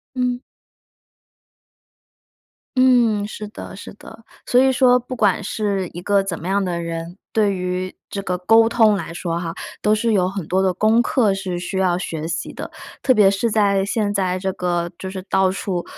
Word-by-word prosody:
嗯。 250 -1 0 2.4
嗯， 240 -5 +4
是 210 0 -7
的， - - -9
是 - - -9
的， 220 +2 -14 0.2
所 250 - +4
以 265 - +4
说 250 -1 +4
不 250 +1 -7
管 210 -3 +2
是 200 -2 -2
一 175 - -7
个 200 +2 +2
怎 185 -4 -4
么 170 - -8
样 200 0 +1
的 175 -2 -2
人， 170 +1 -5 0.2
对 210 -2 +2
于 180 0 -3
这 200 - -5
个 180 -2 -2
沟 225 +5 +5
通 225 -2 +4
来 170 -4 -4
说 170 -1 -3
哈， 165 -1 -4 0.3
都 210 - +3
是 225 +1 0
有 185 -3 +2
很 190 -4 -5
多 190 +2 +1
的 190 -1 +2
功 215 +5 +3
课 230 -7 +2
是 190 -2 -4
需 180 +2 -5
要 180 -2 +2
学 160 -3 -4
习 160 - -4
的。 - - -7 0.3
特 260 - +4
别 210 -4 +5
是 200 +4 0
在 200 -2 +2
现 205 0 -1
在 185 -2 0
这 190 0 -2
个 175 -1 -2
就 190 - -6
是 190 -1 -7
到 190 -1 +3
处 185 -2 -3
195 Hz, 205 characters per minute, -21 LUFS, 180-220 Hz, 2.4 s, 沟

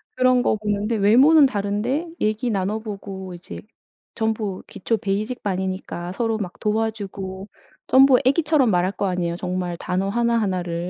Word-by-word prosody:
그런 255 -1 +3
거 - - +2
보는데 210 +1 -1
외모는 260 +9 +6
다른데 230 +7 -1
얘기 215 +3 0
나눠 205 0 -1
보고 195 -3 -7
이제 175 0 -9 0.5
전부 220 -4 -2
기초 210 +3 -2
베이직 215 +4 -3
반이니까 185 -2 -3
서로 225 +1 -1
막 190 -4 -5
도와주고 205 -3 -3 0.4
전부 265 -1 +6
애기처럼 285 -2 +3
말할 180 +1 +1
거 205 - -2
아니에요. 175 -2 -1
정말 180 0 -3
단어 185 +3 -2
1 235 +2 +1
1 190 -3 -1
를. 170 0 -4
205 Hz, 310 characters per minute, -22 LUFS, 190-235 Hz, 0.5 s, 외모는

